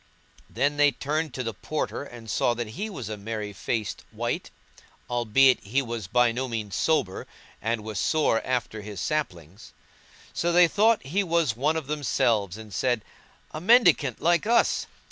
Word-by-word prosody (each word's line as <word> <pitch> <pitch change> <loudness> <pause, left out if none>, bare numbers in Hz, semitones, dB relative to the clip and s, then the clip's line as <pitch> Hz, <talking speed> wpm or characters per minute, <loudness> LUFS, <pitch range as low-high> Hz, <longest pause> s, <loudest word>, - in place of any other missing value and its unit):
Then 145 +1 0
they 145 0 +6
turned 155 +2 -2
to 130 - -3
the 115 -1 -3
Porter 150 +7 -3
and 120 -5 -11
saw 120 +2 +1
that 120 -2 -4
he 200 - -5
was 130 - -6
a 110 -1 -5
merry 105 0 -5
faced 105 +1 -3
wight, - - -3 0.6
albeit 120 +2 +4
he 130 +8 0
was 115 -5 -5
by 120 +3 +3
no 130 +3 -3
means 110 -5 -4
sober 150 - 0 0.3
and 115 0 -1
was 110 -3 -4
sore 150 -8 +2
after 120 -4 -2
his 105 -2 -8
slappings. 95 - -4 0.6
So 175 - 0
they 175 0 +6
thought 215 +6 +3
that 135 - -11
he 200 +6 +1
was 165 -9 +1
one 145 +6 +1
of 160 - -4
themselves 115 -9 0
and 110 -2 -11
said, 120 +1 0 0.5
"A 155 - -6
mendicant 185 - +4
like 175 +4 +3
us! 235 +1 +2
125 Hz, 170 wpm, -26 LUFS, 110-155 Hz, 0.6 s, they